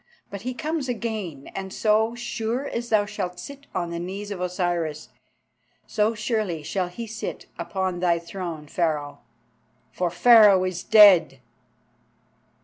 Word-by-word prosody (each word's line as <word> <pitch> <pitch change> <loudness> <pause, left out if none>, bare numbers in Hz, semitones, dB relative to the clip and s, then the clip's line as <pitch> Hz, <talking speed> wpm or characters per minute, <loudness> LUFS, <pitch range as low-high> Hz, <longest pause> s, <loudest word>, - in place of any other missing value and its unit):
But 200 -1 -6
he 250 +3 -4
comes 310 -2 -3
again, 215 - -4
and, 190 0 -5
so 220 +3 +1
sure 240 +2 -3
as 235 -2 -4
thou 215 -2 +3
shalt 190 -4 -5
sit 280 0 -10
on 170 -1 -2
the 170 - -4
knees 195 +4 -6
of 190 -3 -5
Osiris, 175 -4 -2 0.8
so 215 +1 0
surely 215 -7 -2
shall 185 +4 -2
he 205 +7 -7
sit 225 0 -6
upon 190 -2 -2
thy 175 -1 +2
throne, 170 -3 -6
Pharaoh. 150 -3 -2 0.7
For 180 -1 -1
Pharaoh 200 +1 +6
is 185 -1 -3
dead!" 200 -10 +6
195 Hz, 140 wpm, -24 LUFS, 175-225 Hz, 0.8 s, Pharaoh